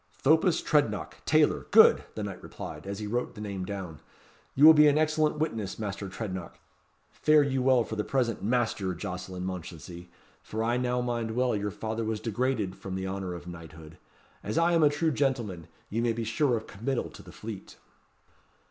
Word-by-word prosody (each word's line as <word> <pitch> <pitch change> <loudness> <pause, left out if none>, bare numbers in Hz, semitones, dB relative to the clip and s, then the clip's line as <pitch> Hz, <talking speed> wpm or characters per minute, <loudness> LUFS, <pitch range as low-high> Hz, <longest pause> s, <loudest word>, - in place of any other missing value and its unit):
"Thopas 160 +5 +4
Trednock, 115 - 0
tailor - - +3
good!" - - +7
the 110 - -3
knight 100 -2 -6
repeated, - - -8
as 100 0 -4
he 105 - -5
wrote 120 +4 -2
the - - -10
name 100 -3 -4
down. 95 -6 -6 0.6
"You 145 - +6
will 160 - +11
be 150 -1 +7
an 145 0 +4
excellent 155 0 +2
witness, 115 -11 -2
Master 100 -2 -4
Trednock. 95 -3 -6 0.5
Fare 155 -1 +4
you 135 -2 0
well 130 -2 +4
for 110 - -6
the 105 - -1
present, 120 -3 0
Master 110 -5 0
Jocelyn 90 0 -5
Mounchensey, 90 -1 -7 0.3
for 110 +1 -4
I 120 +2 +1
now 125 0 0
mind 120 -2 -2
well 125 -2 +2
your 105 0 -1
father 110 +2 -4
was 110 -1 -2
degraded 115 -4 -1
from 95 -1 -6
the 95 0 -3
honour 95 -2 -4
of 85 - -9
knighthood. 80 -2 -11 0.4
As 105 - -3
I 170 +1 +4
am 165 - +4
a 150 - +6
true 155 +2 0
gentleman! 120 - -1 0.2
you 115 +3 0
may 120 -1 +1
be 115 0 -3
sure 120 +3 +1
of 110 - -7
committal 120 +6 -3
to - - -12
the - - -13
Fleet." 105 -3 -9
110 Hz, 190 wpm, -28 LUFS, 95-130 Hz, 0.6 s, will